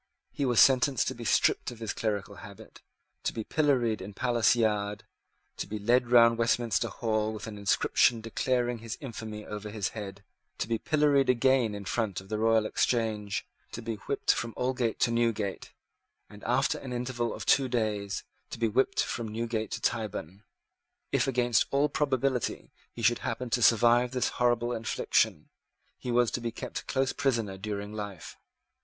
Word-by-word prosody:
He 140 - -2
was 120 -3 +3
sentenced 135 -1 +5
to - - -4
be - - -9
stripped - - +2
of 120 - -9
his 110 -1 -4
clerical 105 -2 -3
habit, 100 -1 -12 0.4
to - - -1
be 110 - -4
pilloried 125 -6 +1
in 100 +1 -8
Palace 120 0 +3
Yard, 105 -3 0 0.5
to - - -4
be 105 +2 -4
led 120 +4 +2
round 115 -1 +6
Westminster 115 0 +1
Hall 110 -2 -1
with 110 -1 -7
an 105 -2 -8
inscription 105 +3 +3
declaring 120 +2 -1
his 115 0 -6
infamy 110 -5 -7
over 105 0 -6
his 105 -2 -2
head, 100 -2 -8 0.3
to - - -2
be 115 -1 -1
pilloried 145 -1 +2
again 125 -3 +3
in 100 -1 -7
front 105 -2 -1
of 95 0 -14
the 110 0 -2
Royal 110 0 +3
Exchange, 110 -3 -1 0.3
to 120 - -6
be 115 0 -3
whipped 140 +7 0
from 115 -1 -4
Aldgate 125 -3 0
to 120 - +3
Newgate, 115 -4 -1 0.6
and, 105 0 -13
after 130 +4 +1
an 130 -2 -7
interval 120 -1 -2
of - - -6
two 135 -2 +4
days, 105 -4 -1 0.3
to - - -6
be 115 0 +1
whipped 120 +5 +2
from 115 -1 -4
Newgate 110 -1 -3
to - - -5
Tyburn. 105 -4 -3 0.7
If, - - +2
against 120 -3 +2
all 140 +2 +2
probability, 135 -4 -1 0.2
he 115 - -8
should 120 +2 +3
happen 125 -2 -4
to 120 - +1
survive 120 +2 +4
this 125 - +1
horrible 120 0 +1
infliction, 115 -1 0 0.5
he 125 - -7
was 120 -1 +3
to 120 - -3
be 115 -1 -3
kept - - -6
close 135 0 0
prisoner 115 -9 0
during 105 0 -5
life. 100 -5 -7
115 Hz, 175 wpm, -29 LUFS, 105-125 Hz, 0.7 s, round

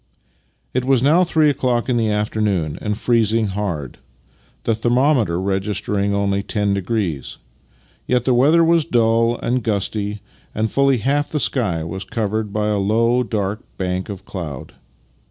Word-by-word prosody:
It 130 - 0
was 130 -1 +2
now 160 +6 +5
three 160 -4 +3
o'clock 125 -3 0
in 125 - +1
the 115 -2 +1
afternoon 105 -6 -1
and 105 -1 -2
freezing 115 -2 +2
hard, 90 -9 -4 0.6
the 115 - +1
thermometer 120 - +2
registering 100 +1 -1
only 100 0 0
ten 100 0 -1
degrees; 95 - -2 0.7
yet 125 -1 +1
the 130 - +3
weather 150 +7 +5
was 165 -1 +3
dull 115 -1 +2
and 125 +2 0
gusty, 105 -1 -2 0.3
and 110 0 -1
fully 140 -1 +3
half 145 +5 0
the 150 - -1
sky 105 - 0
was 95 +4 -5
covered 105 +1 -2
by 105 0 -1
a 105 -1 +1
low, 115 +5 +2
dark 105 -3 -2 0.2
bank 90 +1 -2
of 100 -1 -7
cloud. 80 -9 -7
110 Hz, 150 wpm, -20 LUFS, 100-125 Hz, 0.7 s, now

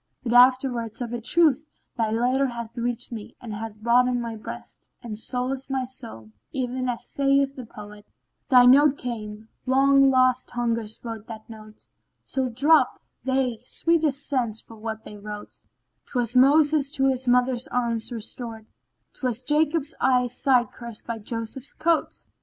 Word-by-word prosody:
But 240 -2 -1
afterwards 245 -2 +4
of 240 -1 -4
a 240 - -3
truth 305 +2 +3 0.3
thy 225 -3 0
letter 250 +5 +1
hath 235 -2 -7
reached 240 0 -3
me 220 -3 -8
and 230 -3 -7
hath 215 0 -7
broadened 245 +2 +3
my 230 -1 -4
breast, 215 - -9
and 215 -3 -6
solaced 255 +3 -3
my 265 -1 -1
soul, 230 - -8 0.2
even 255 -1 -2
as 240 - -4
saith 275 0 +1
the 255 -3 -8
poet, 210 -1 -12 0.4
"Thy 250 -2 +7
note 285 +3 +6
came: 220 -3 -6 0.2
long 275 +1 +5
lost 255 -1 +3
hungers 230 -3 -2
wrote 225 -2 -6
that 220 -2 -9
note, 215 -1 -13 0.2
* - - -51
Till 260 -1 -1
drop 285 +7 +3 0.3
they 260 -3 0
sweetest 305 -1 0
scents 240 -6 -1
for 225 - -13
what 220 0 -6
they 210 - -9
wrote: 210 0 -8 0.5
Twas 245 -2 -1
Moses 290 +2 +5
to 270 -3 +1
his 260 -1 0
mother's 250 0 +2
arms 235 -1 -1
restored; 225 -1 -5 0.3
* - - -50
'Twas 255 -2 -2
Jacob's 305 +2 +1
eye 250 -1 +3
sight 250 0 +2
cured 235 -2 -8
by 230 -1 -4
Joseph's 230 +5 -5
coat!" 330 0 0
245 Hz, 160 wpm, -25 LUFS, 225-265 Hz, 0.5 s, Thy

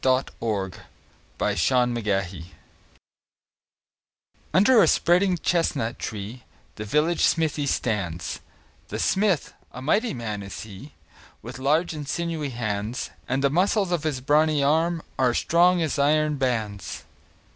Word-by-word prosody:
THE 130 0 +3
VILLAGE 100 -5 -2 0.6
BLACKSMITH 105 -9 0 2.1
Under 215 +4 +5
a - - +5
spreading 180 +1 +3
chestnut 145 -8 0
tree 110 +3 -6 0.3
The 105 - -7
village 150 +9 +1
smithy 155 -3 +1
stands; 95 -10 -2 0.5
The - - -5
smith, 195 -6 +1 0.2
a - - -9
mighty 180 - +1
man 110 -4 -4
is 100 0 -7
he, 110 +7 -11 0.5
With 120 +3 -8
large 155 +6 +1
and 150 -2 -6
sinewy 165 -1 -2
hands; 110 -1 -3 0.2
And 135 +2 0
the 140 - +3
muscles 190 +3 +2
of 175 -3 +1
his 150 -4 -2
brawny 150 +1 +3
arms 160 +3 +1 0.2
Are 125 -2 +3
strong 175 +1 +3
as 150 -2 -2
iron 150 +1 +2
bands. 110 -7 -2
140 Hz, 125 wpm, -25 LUFS, 110-165 Hz, 2.1 s, Under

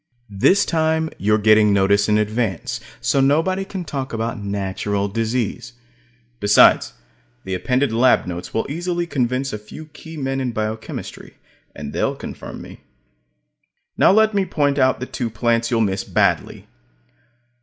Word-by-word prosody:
This 200 - +4
time, 160 -1 0
you're 105 +2 +2
getting 110 0 +4
notice 100 +1 +3
in 105 - +4
advance, 105 -4 -2 0.2
so 135 - +2
nobody 165 +8 +2
can 195 -2 -6
talk 135 -4 -5
about 115 +1 -3
"natural" 100 0 -2
disease. 115 +3 -2 0.7
Besides, 105 0 +5 0.5
the 95 - -5
appended 125 +8 0
lab 125 +2 +3
notes 90 -1 -6
will 110 - -1
easily 175 +3 -2
convince 130 -3 -1
a 105 - -4
few 105 +9 -11
key 160 +1 -12
men 135 -1 -2
in 125 -2 -2
biochemistry; 110 0 -5 0.4
and 75 0 -7
they'll - - 0
confirm - - -8
me. - - -12 1.2
Now - - +5
let 220 +2 +4
me 200 -1 +2
point 145 -5 0
out 130 0 +3
the 130 - -4
two 120 -2 -4
plants 115 +1 0
you'll 115 -2 +1
miss 95 -3 0
badly. - - 0
120 Hz, 145 wpm, -20 LUFS, 105-145 Hz, 1.2 s, Besides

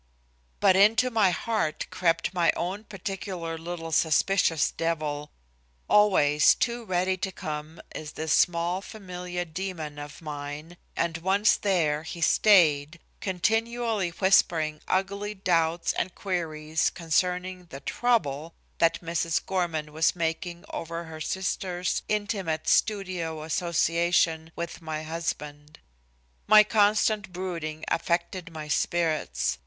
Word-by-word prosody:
But 185 - +5
into 225 +6 +4
my 215 -4 +4
heart 180 -2 -1
crept 170 +1 +1
my 175 -2 +3
own 195 +5 -3
particular 190 -4 -5
little 165 0 -6
suspicious 160 +1 +2
devil 150 -3 -2 0.6
always 150 -8 +5
too 235 -1 -2
ready 185 0 0
to 190 +1 -3
come, 155 -1 -6
is 150 -1 -7
this 160 -1 -1
small 175 +2 +2
familiar 180 -4 -6
demon 160 -4 -5
of 145 0 -9
mine 150 +2 -7 0.2
and 170 0 -1
once 195 +4 +3
there 165 -7 +1
he 165 +2 -7
stayed, 165 -4 +4 0.2
continually 225 +1 0
whispering 165 -4 +2
ugly 200 +2 -1
doubts 170 -3 +1
and 180 +1 -3
queries 160 -4 -1
concerning 180 +2 -1
the 140 -5 -10
"trouble" 165 - 0 0.2
that 165 0 +3
Mrs. 165 -1 0
Gorman 160 -5 -2
was 160 +2 +2
making 170 +1 -3
over 165 +1 -5
her 160 -1 -9
sister's 180 0 -2
intimate 200 -7 -1
studio 180 -7 0
association 165 0 +1
with 170 +1 -5
my 155 -1 -4
husband. 150 -2 -5 0.7
My 215 0 +9
constant 210 -1 +2
brooding 170 -4 -5
affected 170 +1 -1
my 155 -2 -7
spirits. 150 - 0
170 Hz, 115 wpm, -27 LUFS, 160-190 Hz, 0.7 s, My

